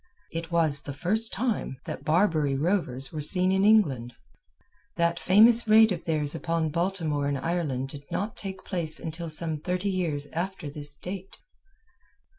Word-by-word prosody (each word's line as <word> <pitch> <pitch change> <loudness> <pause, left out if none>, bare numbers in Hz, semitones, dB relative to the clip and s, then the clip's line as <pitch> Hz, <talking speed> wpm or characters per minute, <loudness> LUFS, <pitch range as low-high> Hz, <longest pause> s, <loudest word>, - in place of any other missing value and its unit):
It 165 0 -5
was 160 -4 +3
the 140 - -7
first 215 +9 +1
time 220 - -2
that - - -6
Barbary 155 -4 +2
rovers 135 -5 -1
were 155 - -4
seen 185 +4 +5
in 190 0 +2
England. 145 - +3 0.8
That 170 0 0
famous 225 +5 +5
raid 220 0 +6
of 175 - -4
theirs 150 -3 0
upon 165 -1 -1
Baltimore 165 -4 -1
in 140 -1 -1
Ireland 135 -3 -2
did 140 0 -10
not 205 +3 -3
take 190 -1 -6
place 165 -4 0
until 165 +1 -6
some 155 0 0
thirty 180 +5 -2
years 160 -6 -2
after 170 -3 -4
this 145 0 -6
date. 190 +3 -8
170 Hz, 155 wpm, -26 LUFS, 150-190 Hz, 0.8 s, raid